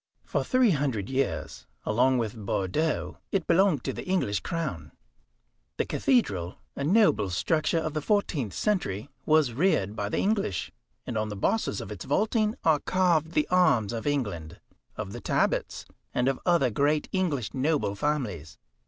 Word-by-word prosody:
For -, -, -1 dB
three 255 Hz, -4 st, +3 dB
hundred 135 Hz, -, -1 dB
years, 130 Hz, -, -2 dB, 0.2 s
along 125 Hz, +4 st, +3 dB
with 115 Hz, -2 st, -2 dB
Bordeaux, 110 Hz, -, -1 dB
it 195 Hz, -4 st, 0 dB
belonged 170 Hz, -5 st, +3 dB
to -, -, -2 dB
the -, -, -6 dB
English 180 Hz, -, +1 dB
crown. 155 Hz, -, -4 dB, 0.8 s
The -, -, +1 dB
cathedral, 95 Hz, -, +1 dB, 0.2 s
a 140 Hz, -, -3 dB
noble 175 Hz, -, +3 dB
structure 155 Hz, -, +1 dB
of 155 Hz, -2 st, -1 dB
the 155 Hz, -, -2 dB
fourteenth 150 Hz, -, 0 dB
century, 140 Hz, -, -1 dB, 0.2 s
was 155 Hz, -6 st, +4 dB
reared 115 Hz, -, +1 dB
by 100 Hz, -2 st, -2 dB
the -, -, -2 dB
English, 200 Hz, -, 0 dB, 0.3 s
and 115 Hz, -3 st, -2 dB
on 110 Hz, 0 st, -2 dB
the 105 Hz, -, -5 dB
bosses 100 Hz, -, 0 dB
of -, -, -8 dB
its 100 Hz, -5 st, -7 dB
vaulting 215 Hz, -, +1 dB
are 155 Hz, -3 st, +4 dB
carved 170 Hz, -3 st, +1 dB
the 305 Hz, -, +2 dB
arms 150 Hz, -, +3 dB
of 115 Hz, +4 st, -4 dB
England, 100 Hz, -, -2 dB, 0.4 s
of -, -, -5 dB
the -, -, -7 dB
Talbots, -, -, 0 dB, 0.3 s
and 125 Hz, -, +2 dB
of 135 Hz, -1 st, 0 dB
other 170 Hz, -8 st, +3 dB
great 145 Hz, +6 st, +1 dB
English 160 Hz, -, -1 dB
noble 140 Hz, -5 st, 0 dB
families. 105 Hz, -, -2 dB
140 Hz, 160 wpm, -27 LUFS, 105-170 Hz, 0.8 s, was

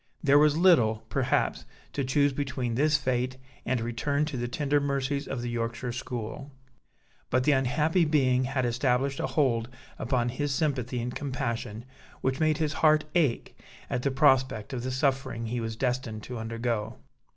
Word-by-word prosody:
There 145 Hz, -1 st, +6 dB
was 150 Hz, 0 st, +4 dB
little, 125 Hz, -12 st, +4 dB
perhaps, -, -, 0 dB, 0.3 s
to 140 Hz, -, -1 dB
choose 140 Hz, +2 st, +2 dB
between 130 Hz, -3 st, -2 dB
this 150 Hz, +5 st, +3 dB
fate 130 Hz, -2 st, -1 dB, 0.3 s
and 125 Hz, 0 st, +1 dB
a -, -, -3 dB
return 140 Hz, +5 st, 0 dB
to 150 Hz, -2 st, -5 dB
the 120 Hz, -1 st, -2 dB
tender 145 Hz, +3 st, +1 dB
mercies 140 Hz, 0 st, -1 dB
of 125 Hz, -3 st, -4 dB
the 120 Hz, -, -3 dB
Yorkshire 115 Hz, +1 st, -3 dB
school: 125 Hz, +3 st, -6 dB, 0.8 s
but 130 Hz, +1 st, +2 dB
the 150 Hz, -, +4 dB
unhappy 150 Hz, +6 st, +2 dB
being 130 Hz, -5 st, +2 dB
had 130 Hz, -1 st, -1 dB
established 125 Hz, +3 st, 0 dB
a -, -, 0 dB
hold 120 Hz, -6 st, +1 dB, 0.3 s
upon 120 Hz, -2 st, 0 dB
his 145 Hz, +4 st, -2 dB
sympathy 130 Hz, -5 st, -1 dB
and 125 Hz, 0 st, -4 dB
compassion, 120 Hz, -5 st, -4 dB, 0.4 s
which 130 Hz, 0 st, 0 dB
made 155 Hz, -1 st, +2 dB
his 155 Hz, -2 st, -1 dB
heart 155 Hz, -1 st, +5 dB
ache 155 Hz, -9 st, +1 dB, 0.4 s
at -, -, 0 dB
the 140 Hz, -, +1 dB
prospect 130 Hz, -4 st, +2 dB
of 125 Hz, -, -3 dB
the 130 Hz, -, -3 dB
suffering 130 Hz, -3 st, -1 dB
he 120 Hz, +2 st, -2 dB
was 115 Hz, -1 st, -4 dB
destined 125 Hz, -3 st, -2 dB
to 125 Hz, 0 st, -6 dB
undergo. 115 Hz, -1 st, -3 dB
130 Hz, 170 wpm, -28 LUFS, 120-145 Hz, 0.8 s, There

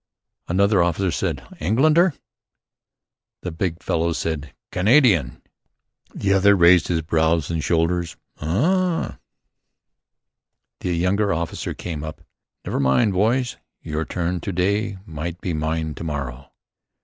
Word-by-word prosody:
Another 100 Hz, +2 st, +3 dB
officer 85 Hz, +2 st, +1 dB
said -, -, -2 dB, 0.2 s
"Engländer?" 155 Hz, -, +3 dB, 1.3 s
The 90 Hz, -, -3 dB
big 85 Hz, 0 st, -3 dB
fellow 85 Hz, +1 st, 0 dB
said 80 Hz, -3 st, -3 dB, 0.2 s
"Kanadien." 95 Hz, -, +3 dB, 0.7 s
The 100 Hz, 0 st, +1 dB
other 100 Hz, +1 st, +5 dB
raised 85 Hz, -2 st, +6 dB
his 80 Hz, -2 st, 0 dB
brows 80 Hz, 0 st, +1 dB
and 80 Hz, -2 st, -2 dB
shoulders: 85 Hz, 0 st, 0 dB, 0.2 s
"Uhh!" 165 Hz, -, 0 dB, 1.7 s
A -, -, -2 dB
younger 90 Hz, +4 st, +1 dB
officer 85 Hz, +1 st, -3 dB
came 80 Hz, -4 st, -5 dB
up: 80 Hz, 0 st, -7 dB, 0.4 s
"Never -, -, -2 dB
mind, 70 Hz, -, +3 dB
boys: 120 Hz, +6 st, +1 dB, 0.3 s
Your 80 Hz, 0 st, -2 dB
turn 90 Hz, +2 st, -2 dB
to 90 Hz, -, -4 dB
day. 100 Hz, +3 st, 0 dB
Might 85 Hz, +2 st, -5 dB
be 90 Hz, -, -3 dB
mine 80 Hz, 0 st, -2 dB
to 75 Hz, -, -8 dB
morrow." 70 Hz, -4 st, -5 dB
85 Hz, 120 wpm, -22 LUFS, 80-100 Hz, 1.7 s, raised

